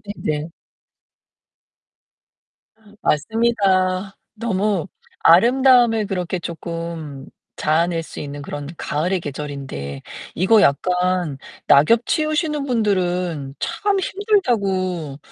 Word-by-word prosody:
네네. 155 Hz, +2 st, -3 dB, 2.5 s
맞습니다. 195 Hz, 0 st, +1 dB, 0.2 s
너무 205 Hz, -5 st, -1 dB, 0.4 s
아름다움을 240 Hz, +3 st, +5 dB
그렇게 185 Hz, -2 st, -2 dB
조금 165 Hz, -4 st, -6 dB, 0.3 s
자아낼 165 Hz, +2 st, +1 dB
수 -, -, -9 dB
있는 145 Hz, 0 st, -6 dB
그런 145 Hz, 0 st, -6 dB
가을의 175 Hz, +5 st, -1 dB
계절인데 135 Hz, -, -6 dB, 0.3 s
이거 205 Hz, +5 st, +4 dB
약간 180 Hz, 0 st, +1 dB, 0.3 s
낙엽 225 Hz, +12 st, +5 dB
치우시는 305 Hz, -2 st, 0 dB
분들은 180 Hz, -, -1 dB
참 395 Hz, +4 st, 0 dB
힘들다고 200 Hz, -, 0 dB
185 Hz, 200 characters per minute, -21 LUFS, 155-225 Hz, 2.5 s, 아름다움을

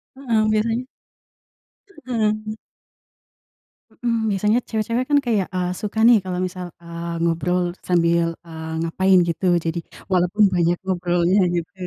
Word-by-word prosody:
heeh, 240 Hz, -5 st, 0 dB
biasanya 225 Hz, +3 st, 0 dB, 1.2 s
Mhm. 215 Hz, -3 st, -1 dB, 1.4 s
Mhm, 230 Hz, -2 st, -1 dB
biasanya 210 Hz, +3 st, +2 dB
cewek-cewek 230 Hz, +3 st, -1 dB
kan, 290 Hz, -, +4 dB
kayak, 215 Hz, -6 st, +1 dB
eee, 180 Hz, -1 st, -2 dB
suka 215 Hz, +1 st, -3 dB
nih, 235 Hz, -1 st, +7 dB
kalau 185 Hz, -1 st, -4 dB
misal, 180 Hz, -1 st, -6 dB
eee, 170 Hz, 0 st, -6 dB
ngobrol 175 Hz, +2 st, 0 dB
sambil, 170 Hz, -1 st, +2 dB, 0.2 s
eee, 160 Hz, -1 st, -7 dB
ngapain, 190 Hz, +3 st, +3 dB
gitu. 175 Hz, +3 st, -1 dB, 0.2 s
Jadi, 165 Hz, +1 st, -1 dB, 0.3 s
walaupun 180 Hz, +4 st, +3 dB
banyak 175 Hz, 0 st, +2 dB
ngobrolnya, 175 Hz, +1 st, +1 dB
gitu. 170 Hz, -1 st, -3 dB
185 Hz, 120 wpm, -22 LUFS, 170-215 Hz, 1.4 s, nih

